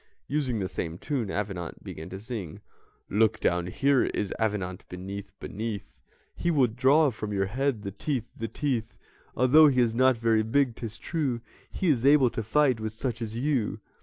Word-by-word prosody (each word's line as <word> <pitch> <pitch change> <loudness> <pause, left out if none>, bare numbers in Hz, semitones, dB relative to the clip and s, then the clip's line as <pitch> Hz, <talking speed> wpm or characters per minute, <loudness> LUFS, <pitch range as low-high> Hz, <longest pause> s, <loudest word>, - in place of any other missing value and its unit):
Using 135 -5 0
the 95 -3 -1
same 85 -1 -4
tune, 125 -2 -2
Avenant 100 -4 -4
began 80 - -8
to 95 - -7
sing: 105 -7 -6 0.5
"Look 110 +1 +2
down, 90 0 +1
here 140 +7 +2
is 100 - -2
Avenant 100 -5 -1
beneath, 95 +2 -7
beneath 105 -1 -5 0.4
He 175 - -1
will 145 -6 +4
draw 135 +6 +4
from 105 -2 -5
your 95 -1 +1
head, 125 +1 -1
the 100 - -4
teeth, 120 +2 -3
the 115 - -4
teeth 115 -2 -2 0.4
Although 145 +5 +7
he 130 -3 +2
is 120 -2 +3
not 130 +1 +4
very 115 -1 +3
big, 120 +2 +1
'tis 115 -2 -6
true, 145 -8 -2 0.3
He 185 - -1
is 125 -6 +2
able 140 -3 +6
to 115 - -3
fight 130 +2 +2
with 110 0 -4
such 120 0 -3
as 110 0 -4
you." 130 -4 0
115 Hz, 180 wpm, -27 LUFS, 105-135 Hz, 0.5 s, Although